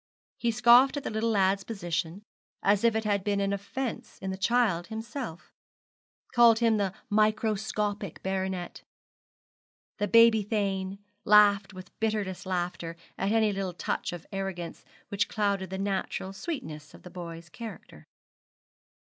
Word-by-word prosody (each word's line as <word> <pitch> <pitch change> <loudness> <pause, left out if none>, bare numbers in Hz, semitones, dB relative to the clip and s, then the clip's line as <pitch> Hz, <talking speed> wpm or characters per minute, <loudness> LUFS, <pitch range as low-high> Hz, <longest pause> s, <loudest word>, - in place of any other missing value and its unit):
He 235 - +1
scoffed 240 +5 +6
at 285 - -4
the - - -3
little 220 +1 0
lad's 195 -2 +2
position, 175 -3 -3 0.4
as 200 +1 +3
if 230 -1 +4
it 220 - 0
had 205 -2 0
been 205 0 0
an 200 0 0
offence 230 +6 -5
in 190 0 -4
the - - -3
child 195 -4 +1
himself 220 - -6 0.8
called 235 -2 +7
him 225 -2 +3
the 195 -2 -1
microscopic 215 -2 0
baronet, 190 -2 -3 1.2
the 205 - +1
baby 230 +2 +6
thane, 195 -2 -2 0.3
laughed 205 -1 +5
with 185 0 -10
bitterest 200 -4 -2
laughter 175 -2 -3 0.2
at 195 +1 -1
any 220 -2 +3
little 195 -2 -3
touch - - -3
of 175 -2 -8
arrogance 195 -3 -5 0.3
which 200 +1 0
clouded 200 -3 0
the 190 - -4
natural 195 -1 -2
sweetness 195 - -6
of - - -16
the 180 - -11
boy's 170 -2 -8
character. 225 +6 -10
200 Hz, 140 wpm, -28 LUFS, 190-220 Hz, 1.2 s, called